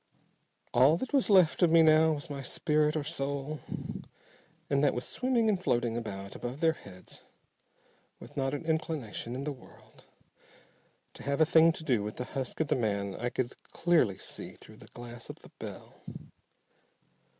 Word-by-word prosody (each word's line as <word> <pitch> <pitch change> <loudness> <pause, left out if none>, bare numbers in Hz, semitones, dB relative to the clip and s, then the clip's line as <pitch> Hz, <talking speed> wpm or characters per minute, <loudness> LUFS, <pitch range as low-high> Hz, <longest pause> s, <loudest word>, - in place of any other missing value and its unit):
All 135 +6 +6
that 260 - -5
was 275 -5 +3
left 185 -5 +5
of 175 - +6
me 165 0 +6
now 160 0 +5
was 145 -1 -5
my 140 -1 -5
spirit, 150 +2 +1
or 155 - 0
soul. 140 -1 -3 1.1
And 140 0 +1
that 145 - +3
was 125 - -2
swimming 250 -3 +1
and 200 -4 +1
floating 120 -6 +1
about 100 -4 -5
above 125 +3 -5
their 160 0 +3
heads 95 - -13 1.0
with - - -13
not 135 0 0
an 145 - -6
inclination 155 -7 -2
in 135 - -4
the 150 - -2
world 130 -4 -15 1.1
to - - -10
have 140 +1 -1
a 160 - +6
thing 160 +1 +6
to 160 - -5
do 125 -8 +2
with 105 +1 -5
the 125 - -4
husk 130 +1 -4
of 155 - -1
the - - +3
man 100 -4 -1
I 120 +4 -2
could 125 0 -2 0.2
clearly 160 - +3
see - - -6
through - - -15
the - - -15
glass 120 -1 -9
of - - -6
the - - -16
bell. - - -9
140 Hz, 175 wpm, -30 LUFS, 120-160 Hz, 1.1 s, All